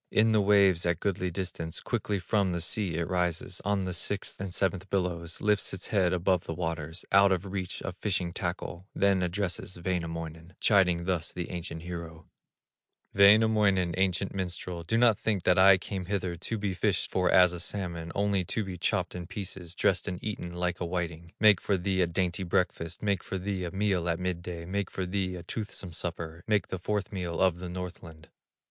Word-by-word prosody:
In 110 +1 +4
the 110 -1 +4
waves 100 -4 +5
at 85 -1 +1
goodly 90 -2 -1
distance, 90 -2 -4
Quickly 105 - -1
from 95 0 +1
the 85 - -1
sea 90 +1 0
it 85 0 -1
rises 90 0 -1
On 100 -1 0
the 90 - -3
sixth 95 +2 -1
and 95 -2 -4
seventh 95 +1 -1
billows, 90 -3 -2
Lifts 105 -1 +1
its 95 - -6
head 95 -4 +3
above 90 0 +1
the 80 - -4
waters, 80 -1 -4
Out 100 0 +6
of 95 +1 0
reach 95 -1 -4
of 95 - -4
fishing 90 -4 -1
tackle, 90 0 -4
Then 100 -1 +3
addresses 90 0 -2
Wainamoinen, 85 -1 -4
Chiding 90 -5 +3
thus 90 -3 -1
the 90 -1 -5
ancient 85 -2 -5
hero: 85 -2 -7 0.9
"Wainamoinen, 100 -3 +5
ancient 95 0 0
minstrel, 90 -2 -4
Do 85 +7 0
not 115 -3 +5
think 105 -5 0
that 90 +1 +4
I 95 0 +8
came 95 0 -5
hither 95 -2 -2
To 100 +7 -4
be 100 -2 -1
fished - - 0
for - - +2
as 90 0 +6
a 90 - -5
salmon, 85 -3 -3
Only 100 -2 +1
to 110 - -1
be 95 -3 -6
chopped - - 0
in 90 -1 -6
pieces, 95 -3 -6
Dressed 95 +1 +1
and 90 -2 -2
eaten 90 -5 -4
like 90 +1 -1
a - - 0
whiting 85 -1 -4
Make 105 -3 +6
for 100 - +1
thee 95 +1 0
a 90 - +3
dainty 90 +2 -1
breakfast, 90 -1 -1
Make 100 -4 +1
for 95 - -4
thee 95 -1 -2
a 85 - -4
meal 95 -3 0
at 85 +1 0
midday, 90 -2 -4
Make 100 +2 -2
for 95 - -3
thee 90 0 -1
a 85 - -7
toothsome 100 -2 -5
supper, 85 0 -5
Make 105 -3 +1
the 95 - -3
fourth 105 +1 -2
meal 90 -4 -3
of 90 -2 +3
the 90 0 -6
Northland." 85 -3 -8
90 Hz, 195 wpm, -29 LUFS, 85-100 Hz, 0.9 s, I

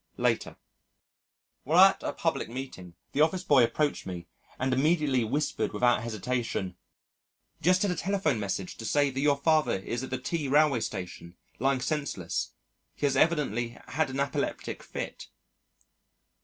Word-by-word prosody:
Later: - - 0 1.1
While 165 +7 +6
at - - -13
a - - -2
public 165 -8 -1
meeting, 115 -9 -7 0.2
the 145 - +1
office 175 +4 +2
boy 140 -8 +5
approached 145 +2 0
me 90 -2 -6 0.3
and 130 0 0
immediately 145 -2 +2
whispered 140 +7 -1
without 120 -2 +3
hesitation, 115 -4 -3 0.9
"Just 180 +4 +4
had 200 - +1
a - - -1
telephone 175 - 0
message 95 -2 -3
to 115 - -7
say 145 +3 +2
that 135 - -4
your 145 0 +3
father 155 -4 +2
is 120 +6 -4
at 130 - -5
the 130 - -2
T 145 +3 -3
Railway 145 -2 +4
Station, 90 -4 -6 0.2
lying 135 +1 +1
senseless. 125 - -2 0.5
He - - -1
has 140 -1 +2
evidently 130 -7 +1
had 155 -1 0
an 135 +1 -4
apoplectic 140 -1 -2
fit." - - -6
135 Hz, 150 wpm, -28 LUFS, 115-150 Hz, 1.1 s, While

